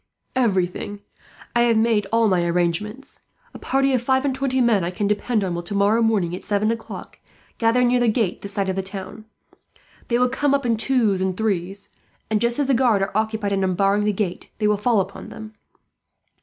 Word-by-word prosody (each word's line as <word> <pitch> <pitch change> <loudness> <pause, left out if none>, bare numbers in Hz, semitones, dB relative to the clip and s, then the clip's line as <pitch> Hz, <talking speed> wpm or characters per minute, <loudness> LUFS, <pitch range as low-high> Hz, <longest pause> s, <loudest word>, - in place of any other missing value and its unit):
"Everything. 205 -3 0 0.5
I 240 - +4
have 235 -2 +3
made 220 -3 +2
all 230 0 +3
my 185 -3 +2
arrangements. 175 +8 -2 0.3
A - - -10
party 270 0 +1
of 250 - +2
five 265 +2 +1
and 275 - +1
twenty 265 0 -1
men 230 -6 +3
I 170 - -1
can 185 +3 -3
depend 210 +2 0
on 185 -2 -2
will, 170 - -3
tomorrow 200 +5 +1
morning 200 -7 +1
at - - -9
seven 210 +1 +1
o'clock, 230 -1 -7 0.4
gather 230 +2 +3
near 245 0 +3
the 240 - +2
gate 220 -4 0
this 200 0 -3
side 200 -1 -1
of 190 - -1
the 190 - -1
town. 195 +3 -8 0.8
They 235 - +1
will 250 +1 +3
come 275 +2 +1
up 275 -2 -2
in 230 -1 +2
twos 220 -4 +1
and 190 -1 -1
threes 195 -2 -2 0.4
and, 215 - +1
just 235 0 +1
as 290 - +1
the 270 - +2
guard 235 -6 +3
are 195 - -4
occupied 220 -1 -1
in 195 -1 +1
unbarring 195 +2 +1
the 210 - +2
gate, 190 -3 -3
they 210 - +1
will 210 - +3
fall 210 0 +2
upon 195 +1 -8
them. 220 0 -10
215 Hz, 210 wpm, -22 LUFS, 195-240 Hz, 0.8 s, I